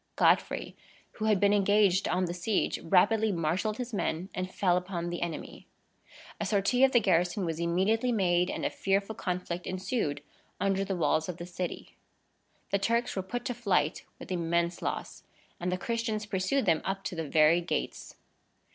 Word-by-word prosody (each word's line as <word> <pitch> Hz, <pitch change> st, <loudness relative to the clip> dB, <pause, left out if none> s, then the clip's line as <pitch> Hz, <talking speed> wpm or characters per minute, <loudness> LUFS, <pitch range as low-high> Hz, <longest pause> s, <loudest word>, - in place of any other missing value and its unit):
Godfrey, -, -, +2 dB, 0.4 s
who 215 Hz, -, -4 dB
had 210 Hz, -3 st, +3 dB
been 205 Hz, +1 st, +4 dB
engaged 200 Hz, -1 st, +3 dB
on 185 Hz, +1 st, +1 dB
the 175 Hz, -, -3 dB
siege, 180 Hz, +4 st, 0 dB
rapidly 205 Hz, +5 st, +3 dB
marshalled 180 Hz, +5 st, -1 dB
his 250 Hz, -1 st, -5 dB
men, 180 Hz, -2 st, -2 dB
and 185 Hz, 0 st, -4 dB
fell 180 Hz, -3 st, +2 dB
upon 180 Hz, -1 st, -3 dB
the 175 Hz, -, -4 dB
enemy. 170 Hz, -3 st, -5 dB, 0.7 s
A -, -, -1 dB
sortie 210 Hz, +5 st, +2 dB
of 270 Hz, -, +6 dB
the 240 Hz, -, +5 dB
garrison 180 Hz, -1 st, +1 dB
was 165 Hz, -1 st, -3 dB
immediately 195 Hz, +8 st, +1 dB
made, 180 Hz, -4 st, +2 dB
and -, -, -3 dB
a -, -, 0 dB
fearful 195 Hz, +2 st, 0 dB
conflict 180 Hz, -3 st, -4 dB
ensued 185 Hz, -, -2 dB, 0.4 s
under 195 Hz, 0 st, +1 dB
the 195 Hz, -1 st, -2 dB
walls 160 Hz, -1 st, +1 dB
of 175 Hz, -, -4 dB
the 175 Hz, -, -6 dB
city. 180 Hz, 0 st, -6 dB, 0.7 s
The 200 Hz, -, +2 dB
Turks 230 Hz, +4 st, 0 dB
were 190 Hz, -, 0 dB
put 240 Hz, +6 st, -5 dB
to 245 Hz, -, -1 dB
flight 200 Hz, -8 st, 0 dB
with -, -, -10 dB
immense 170 Hz, 0 st, 0 dB
loss, -, -, -4 dB, 0.4 s
and 180 Hz, +1 st, -2 dB
the 180 Hz, -, 0 dB
Christians 225 Hz, +1 st, -2 dB
pursued 200 Hz, +7 st, 0 dB
them 165 Hz, -3 st, +3 dB
up 195 Hz, 0 st, -3 dB
to 190 Hz, -, -4 dB
the 165 Hz, -2 st, -3 dB
very 155 Hz, +3 st, +5 dB
gates. 170 Hz, -, -4 dB
185 Hz, 175 wpm, -29 LUFS, 175-210 Hz, 0.7 s, of